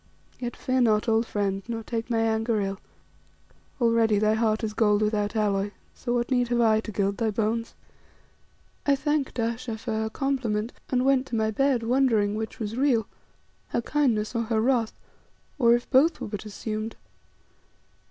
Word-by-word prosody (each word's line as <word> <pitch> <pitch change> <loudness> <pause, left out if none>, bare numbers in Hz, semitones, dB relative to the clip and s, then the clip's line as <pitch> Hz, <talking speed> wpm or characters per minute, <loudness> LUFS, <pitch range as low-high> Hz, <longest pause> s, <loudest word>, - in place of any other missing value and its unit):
Yet 240 -1 -4
fear 255 0 0
not, 215 -1 +3
old 225 0 +2
friend, 195 -2 -1
nor 230 -1 -4
take 230 +1 -4
my 230 - +1
anger 225 0 +1
ill. 195 0 -2 1.0
Already 230 -3 +3
thy 215 +1 +3
heart 220 0 +1
is 215 -1 -2
gold 210 -1 +3
without 210 0 0
alloy, 205 -2 +1 0.2
so 240 -1 -3
what 240 +1 -1
need 245 -1 +2
have 240 0 0
I 220 -2 +4
to 220 - -6
gild 200 0 0
thy 225 -2 +1
bones?" 225 +2 -1 1.1
I 280 - +3
thanked 285 -1 -1
Ayesha 230 0 -2
for 225 +1 -5
her 220 0 -1
compliment, 240 -4 -1 0.2
and 255 0 +1
went 270 -1 +3
to 235 - -4
my 220 -1 +1
bed 265 +1 +1
wondering 230 -4 +2
which 220 0 -4
was 220 -2 -4
real, 250 -4 +2 0.6
her - - -1
kindness 240 -8 +1
or 230 - 0
her 220 0 0
wrath, 235 -1 +1 0.6
or 235 -2 +6
if 240 - -3
both 290 +5 +4
were - - -5
but 205 0 -6
assumed. 215 +1 -5
225 Hz, 170 wpm, -26 LUFS, 215-245 Hz, 1.1 s, or